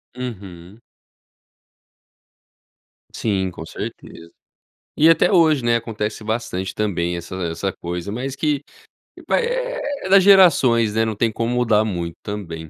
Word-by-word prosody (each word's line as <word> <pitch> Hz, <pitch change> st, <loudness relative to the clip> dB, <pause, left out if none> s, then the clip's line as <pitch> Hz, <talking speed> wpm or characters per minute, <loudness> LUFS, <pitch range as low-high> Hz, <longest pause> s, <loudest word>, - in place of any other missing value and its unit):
Uhum. 100 Hz, -5 st, -8 dB, 2.3 s
Sim, 95 Hz, -4 st, -1 dB
com 80 Hz, -, -9 dB
certeza. 85 Hz, 0 st, -9 dB, 0.7 s
E 160 Hz, +2 st, +6 dB
até 165 Hz, -, +4 dB
hoje, 160 Hz, -7 st, +4 dB
né, 120 Hz, 0 st, +3 dB
acontece 110 Hz, -2 st, -4 dB
bastante 110 Hz, -4 st, -3 dB
também 90 Hz, -5 st, -1 dB
essa 85 Hz, +2 st, -8 dB, 0.2 s
essa 90 Hz, +4 st, -3 dB
coisa, 90 Hz, +3 st, -6 dB
mas 130 Hz, +3 st, -4 dB
que 150 Hz, -2 st, 0 dB, 0.7 s
vai 475 Hz, -, +2 dB
eh -, -, -2 dB, 0.3 s
é -, -, -4 dB
das 195 Hz, -1 st, +6 dB
gerações, 140 Hz, -, +5 dB
né, 110 Hz, 0 st, +2 dB
não 110 Hz, -, -3 dB
tem 115 Hz, +2 st, 0 dB
como 115 Hz, +2 st, -2 dB
mudar 115 Hz, -3 st, +2 dB
muito 85 Hz, -5 st, -4 dB
também. 85 Hz, -6 st, -6 dB
110 Hz, 130 wpm, -21 LUFS, 95-135 Hz, 2.3 s, E